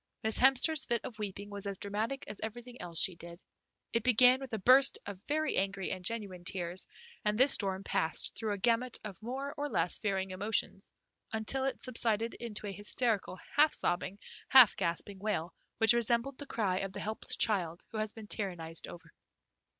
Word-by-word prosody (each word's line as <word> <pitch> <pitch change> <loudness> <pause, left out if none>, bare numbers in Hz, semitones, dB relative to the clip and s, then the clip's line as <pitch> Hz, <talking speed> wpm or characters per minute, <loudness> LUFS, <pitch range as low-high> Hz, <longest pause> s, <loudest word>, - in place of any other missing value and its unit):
Miss 220 0 0
Hemster's 270 +4 +4
fit 235 -1 0
of 220 -3 -8
weeping 205 0 -6
was 200 0 -5
as 200 -1 -3
dramatic 215 +8 -3
as 210 - -6
everything 240 +3 -7
else 170 -2 -2
she 190 - +4
did. 170 0 -11 0.5
It 230 - +1
began 250 +2 +5
with 270 -2 -8
a 220 - -1
burst 260 +7 +5
of 200 -2 -7
very 310 +1 0
angry 195 0 -1
and 185 -1 -5
genuine 195 -4 -3
tears, 180 -1 -2 0.4
and 210 0 +1
this 265 +3 +5
storm 195 -1 +2
passed 160 -4 -1
through 220 -2 -3
a - - -3
gamut 235 +4 +1
of 200 -3 -8
more 270 +5 -4
or 290 0 -3
less 175 -7 +1
varying 195 -3 -1
emotions 195 0 -1 0.4
until 225 +5 +2
it 270 - -2
subsided 230 -2 -1
into 220 -3 -7
a 200 - -3
hysterical 205 0 -1 0.2
half 300 +1 +5
sobbing, 185 +2 -1 0.3
half 250 -6 +8
gasping 180 +4 -2
wail 190 -5 -2 0.2
which 225 +1 +5
resembled 235 +3 +2
the 285 - -7
cry 195 -7 0
of 195 -1 -4
the - - -6
helpless 215 +1 -1
child 180 -6 0
who 220 - -4
had 215 -1 -2
been 220 -2 -9
tyrannized 175 -6 -4
over. 175 - -12
210 Hz, 185 wpm, -32 LUFS, 190-240 Hz, 0.5 s, half